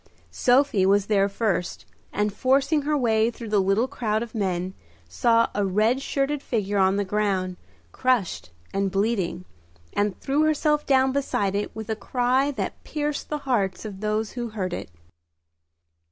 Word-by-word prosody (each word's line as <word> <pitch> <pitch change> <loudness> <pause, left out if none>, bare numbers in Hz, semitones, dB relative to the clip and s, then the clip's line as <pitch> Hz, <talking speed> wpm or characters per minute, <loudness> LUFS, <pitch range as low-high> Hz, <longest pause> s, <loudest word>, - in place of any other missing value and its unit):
Sophie 250 -5 +3
was 195 +1 +3
there 200 -1 +2
first, 195 -4 -2 0.3
and 210 0 0
forcing 275 +6 +2
her 295 +1 0
way 225 -3 +2
through 230 -1 -8
the 210 -2 +3
little 195 +6 +2
crowd 220 -3 -1
of 235 - -10
men, 185 -4 -1 0.3
saw 230 - +3
a 205 - 0
red 215 +7 +2
shirted 275 +1 -1
figure 205 -5 -1
on 190 0 +4
the 205 0 0
ground, 190 -2 0 0.4
crushed 185 - 0 0.2
and 195 0 +1
bleeding, 195 -3 -1 0.5
and 205 -2 0
threw 280 +3 0
herself 300 -1 +2
down 265 -1 +4
beside 260 -8 0
it 205 +1 -3
with 220 -1 -6
a 220 - -1
cry 250 +5 +1
that 285 - -4
pierced 295 -1 -3
the 300 - -1
hearts 205 -7 0
of 200 -3 -7
those 215 +1 -1
who 240 -1 -4
heard 190 -5 -3
it. - - -5
215 Hz, 160 wpm, -25 LUFS, 195-260 Hz, 0.5 s, on